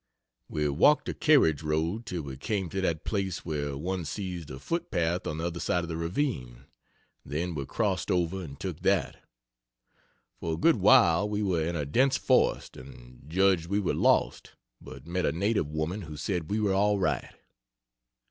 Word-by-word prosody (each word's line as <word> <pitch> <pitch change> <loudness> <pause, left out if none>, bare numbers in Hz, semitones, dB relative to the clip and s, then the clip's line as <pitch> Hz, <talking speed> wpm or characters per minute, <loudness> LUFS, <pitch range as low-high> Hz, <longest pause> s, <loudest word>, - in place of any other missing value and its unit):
We 75 -1 -1
walked 85 - +4
the - - -3
carriage 130 - +4
road 80 +9 -1
till 90 -6 -3
we 70 -2 -7
came 95 +6 -2
to 95 - -3
that 85 -4 -1
place 95 -4 -2
where 70 -3 -3
one 90 +4 -3
sees 90 -2 -5
the 65 - -8
foot 170 - -3
path 85 +1 -1
on 75 - -3
the 80 - -3
other 85 0 -3
side 85 +1 0
of 85 - -6
the 80 - -3
ravine, 85 - -3 0.6
then 85 +4 -3
we 70 -3 -4
crossed 100 -6 -1
over 90 +1 0
and 70 -4 -10
took - - -5
that. - - +1 1.2
For 80 -1 -2
a - - -8
good 165 - +4
while 105 -3 +5
we 105 0 -1
were 90 -5 +1
in 85 +2 -2
a 75 -3 -2
dense 130 - +2
forest - - +1
and 65 -1 -13
judged 95 -1 +2
we 100 +3 0
were 100 - 0
lost, - - +1 0.3
but 70 +1 -11
met 90 +2 -1
a - - +2
native 100 0 0
women 80 +7 -3
who 80 -4 -8
said 80 +2 -3
we 105 - 0
were 105 -2 +1
all 105 +1 +3
right. 95 - -1
85 Hz, 185 wpm, -28 LUFS, 75-100 Hz, 1.2 s, while